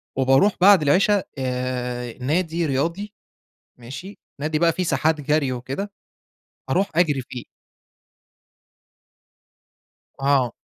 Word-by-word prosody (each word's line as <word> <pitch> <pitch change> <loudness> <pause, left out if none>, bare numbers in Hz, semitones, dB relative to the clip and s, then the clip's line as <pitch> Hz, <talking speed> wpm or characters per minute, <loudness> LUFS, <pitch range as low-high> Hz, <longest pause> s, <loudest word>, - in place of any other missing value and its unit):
وبارُوح 135 +9 +4
بَعد 195 -2 +7
العِشا 190 +7 +3
آآ 125 -2 -3
نادي 165 +4 0
رياضي، 165 +9 -2 0.6
ماشي، 130 - -9 0.2
نادي 155 +1 -1
بقى 170 0 +3
في 185 - -2
ساحات 155 0 +1
جرْي 145 -2 +1
وكده، 135 +11 -5 0.8
أروح 195 +2 +1
أجرِي 150 -6 +2
فيه. 125 -2 -7 2.8
آه. 135 -3 +2
145 Hz, 95 wpm, -22 LUFS, 130-175 Hz, 2.8 s, بَعد